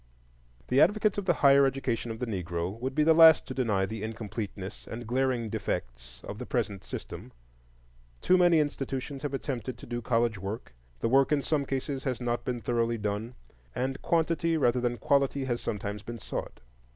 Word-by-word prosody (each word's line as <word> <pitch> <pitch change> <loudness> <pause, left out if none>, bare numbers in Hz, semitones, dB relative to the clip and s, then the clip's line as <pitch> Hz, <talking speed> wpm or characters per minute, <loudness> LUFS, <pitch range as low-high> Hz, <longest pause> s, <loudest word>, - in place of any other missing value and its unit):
The 130 +2 +4
advocates 210 -1 +3
of 200 - -5
the 175 - +4
higher 140 0 +7
education 130 -3 -1
of 110 - -4
the 125 - -3
Negro 90 -1 -3
would 130 +2 -3
be 150 - +4
the 160 +1 +6
last 160 -1 +8
to 130 - -6
deny 110 -7 +1
the 110 +1 -6
incompleteness 105 -2 -6
and 120 +1 -6
glaring 125 0 0
defects - - -5
of 105 - -7
the 125 - -5
present 105 -6 -2
system: - - -7 0.9
too 185 - +4
many 175 -3 +5
institutions 135 -2 -3
have 145 -2 -2
attempted 130 -3 -4
to - - -11
do 120 0 -4
college 115 -2 +1
work, 100 - -6 0.3
the - - +1
work 135 +3 +4
in 145 -2 +2
some 145 -2 0
cases 135 0 -3
has 130 -3 -1
not 120 -1 -2
been 120 -2 -3
thoroughly 115 +1 0
done, 105 +3 -3 0.4
and 130 +2 -2
quantity 165 0 +1
rather 125 -4 +2
than 120 0 0
quality 140 +3 +1
has 120 -2 -2
sometimes 105 0 -4
been 120 +3 -7
sought. - - -6
120 Hz, 185 wpm, -29 LUFS, 110-140 Hz, 0.9 s, last